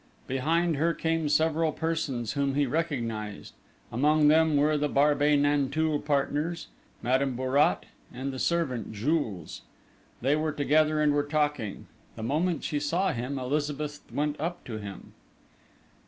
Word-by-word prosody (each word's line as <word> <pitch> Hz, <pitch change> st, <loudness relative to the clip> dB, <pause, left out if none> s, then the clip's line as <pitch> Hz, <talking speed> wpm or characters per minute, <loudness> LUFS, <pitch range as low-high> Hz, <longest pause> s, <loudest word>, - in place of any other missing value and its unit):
Behind 160 Hz, +5 st, +1 dB
her 165 Hz, +3 st, +1 dB
came 160 Hz, -2 st, 0 dB
several 160 Hz, +1 st, +2 dB
persons 150 Hz, -9 st, -2 dB
whom 140 Hz, -1 st, 0 dB
he 145 Hz, 0 st, +3 dB
recognised: 120 Hz, -9 st, -3 dB, 0.4 s
among 150 Hz, +5 st, +4 dB
them 160 Hz, -1 st, +4 dB
were 150 Hz, +2 st, +3 dB
the 150 Hz, 0 st, 0 dB
Barbey 145 Hz, +1 st, +3 dB
Nanteuil 145 Hz, +2 st, +1 dB
partners, 150 Hz, +3 st, -1 dB, 0.3 s
Madame 130 Hz, +2 st, +1 dB
Bourrat, 130 Hz, +3 st, +2 dB, 0.3 s
and 135 Hz, +2 st, -4 dB
the 130 Hz, -, -5 dB
servant, 130 Hz, -, -1 dB
Jules. 110 Hz, -, -2 dB, 0.6 s
They 135 Hz, +4 st, +2 dB
were 155 Hz, 0 st, -1 dB
together 155 Hz, +1 st, +2 dB
and 150 Hz, -1 st, +3 dB
were 145 Hz, -, +2 dB
talking. 145 Hz, -7 st, -1 dB, 0.3 s
The 110 Hz, -, -7 dB
moment 155 Hz, +6 st, 0 dB
she 150 Hz, -, -1 dB
saw 170 Hz, +5 st, 0 dB
him, 125 Hz, +4 st, -3 dB
Elizabeth 145 Hz, +2 st, -2 dB
went 150 Hz, 0 st, -1 dB
up 170 Hz, +3 st, -3 dB
to 110 Hz, -3 st, -5 dB
him. 100 Hz, -3 st, -9 dB
145 Hz, 140 wpm, -28 LUFS, 130-155 Hz, 0.6 s, among